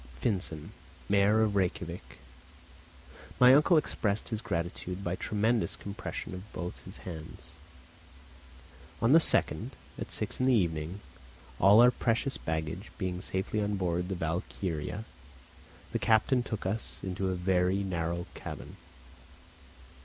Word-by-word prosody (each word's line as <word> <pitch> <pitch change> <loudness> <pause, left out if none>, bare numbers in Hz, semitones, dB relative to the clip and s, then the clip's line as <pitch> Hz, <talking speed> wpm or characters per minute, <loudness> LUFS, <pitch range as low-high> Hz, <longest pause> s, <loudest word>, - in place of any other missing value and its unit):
Finsen, 85 - -2 0.4
mayor 100 +2 +4
of 105 -2 +1
Rejkiavik. 90 -2 -2 1.2
My 125 +1 +9
uncle 155 +5 +6
expressed 105 -8 0
his 110 -2 -3
gratitude 90 -1 -3
by 85 0 -1
tremendous 110 +4 0
compressions 100 -2 -6
of 95 +3 -9
both 90 0 -6
his 95 - -9
hands. 80 -4 -9 1.4
On 115 +3 +3
the 160 - +9
2nd, - - +2 0.3
at - - -5
six - - -2
in 130 - +2
the 130 - +5
evening, 85 -1 -1 0.6
all 100 +4 +8
our 125 +1 +8
precious 120 +3 0
baggage 80 +5 -4
being 90 -3 -2
safely 95 +4 -2
on 105 0 0
board 90 -1 -1
the 95 - -1
Valkyria, 85 +2 -3 0.9
the - - -1
captain 115 +4 +3
took 110 -5 -5
us 105 +4 -3
into 95 0 -2
a 95 - 0
very 90 +2 +2
narrow 85 -2 -2
cabin. - - -8
95 Hz, 130 wpm, -30 LUFS, 90-110 Hz, 1.4 s, My